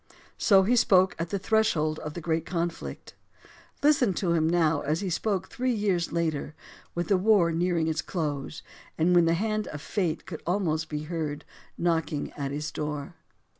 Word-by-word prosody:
So 195 Hz, -3 st, +5 dB
he 235 Hz, +6 st, +3 dB
spoke 185 Hz, -5 st, +4 dB
at 165 Hz, 0 st, -2 dB
the 200 Hz, -, -1 dB
threshold 185 Hz, -7 st, +1 dB
of 150 Hz, 0 st, -7 dB
the 175 Hz, -, -5 dB
great 160 Hz, 0 st, 0 dB
conflict. 170 Hz, -1 st, -4 dB, 0.7 s
Listen 270 Hz, -10 st, +4 dB
to 175 Hz, -2 st, 0 dB
him 160 Hz, -1 st, +2 dB
now 165 Hz, -3 st, +2 dB
as 155 Hz, +5 st, -1 dB
he 190 Hz, -3 st, -2 dB
spoke 190 Hz, +1 st, -1 dB
three 255 Hz, 0 st, -1 dB
years 195 Hz, -5 st, 0 dB
later, 160 Hz, -3 st, -2 dB, 0.4 s
with 175 Hz, 0 st, -1 dB
the 195 Hz, -, +4 dB
war 190 Hz, -3 st, +4 dB
nearing 170 Hz, -1 st, +1 dB
its 160 Hz, -1 st, 0 dB
close 150 Hz, -4 st, -4 dB, 0.3 s
and 170 Hz, +3 st, +3 dB
when 175 Hz, -1 st, +6 dB
the 165 Hz, 0 st, +3 dB
hand 215 Hz, +3 st, -1 dB
of 150 Hz, -, -6 dB
fate 170 Hz, 0 st, -2 dB
could 160 Hz, -, -7 dB
almost 165 Hz, -4 st, 0 dB
be 150 Hz, -1 st, -3 dB
heard 155 Hz, -2 st, -4 dB, 0.3 s
knocking 165 Hz, -3 st, -1 dB
at 140 Hz, -2 st, -4 dB
his 150 Hz, +2 st, -4 dB
door. 150 Hz, -2 st, -4 dB
170 Hz, 175 wpm, -27 LUFS, 155-190 Hz, 0.7 s, when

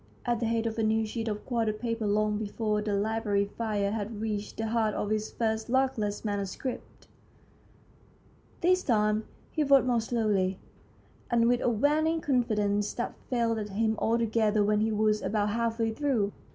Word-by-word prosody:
at 240 Hz, -2 st, +1 dB
the 230 Hz, -, 0 dB
head 230 Hz, 0 st, 0 dB
of 225 Hz, 0 st, -2 dB
a -, -, +2 dB
new 220 Hz, 0 st, +2 dB
sheet 225 Hz, +1 st, -4 dB
of 210 Hz, -1 st, -3 dB
quarto 230 Hz, -3 st, 0 dB
paper 230 Hz, 0 st, -3 dB
long 210 Hz, +1 st, +1 dB
before 210 Hz, 0 st, -1 dB
the 210 Hz, -1 st, -1 dB
library 205 Hz, -1 st, 0 dB
fire 205 Hz, -1 st, -2 dB
had 215 Hz, 0 st, -4 dB
reached 210 Hz, -1 st, -3 dB
the 225 Hz, -, -2 dB
heart 220 Hz, -2 st, +1 dB
of 210 Hz, -, -2 dB
his 215 Hz, 0 st, -1 dB
first 220 Hz, 0 st, -2 dB
luckless 240 Hz, -6 st, 0 dB
manuscript. 205 Hz, +5 st, -4 dB, 1.6 s
This 365 Hz, +2 st, +3 dB
time 215 Hz, -4 st, +1 dB, 0.3 s
he 310 Hz, -, 0 dB
wrote 275 Hz, -2 st, +5 dB
more 240 Hz, -2 st, +2 dB
slowly, 210 Hz, -5 st, 0 dB, 0.7 s
and 235 Hz, -1 st, +3 dB
with 245 Hz, 0 st, +2 dB
a -, -, +2 dB
waning 300 Hz, +8 st, +2 dB
confidence 210 Hz, -7 st, +1 dB
that 240 Hz, -, -3 dB, 0.2 s
failed 230 Hz, -4 st, 0 dB
him 220 Hz, +2 st, 0 dB
altogether 220 Hz, -2 st, +2 dB
when 210 Hz, +1 st, +2 dB
he 220 Hz, +1 st, +1 dB
was 215 Hz, 0 st, +2 dB
about 205 Hz, +1 st, 0 dB
half 230 Hz, 0 st, -1 dB
way 225 Hz, -1 st, +1 dB
through. 225 Hz, -5 st, 0 dB
220 Hz, 165 wpm, -29 LUFS, 210-235 Hz, 1.6 s, wrote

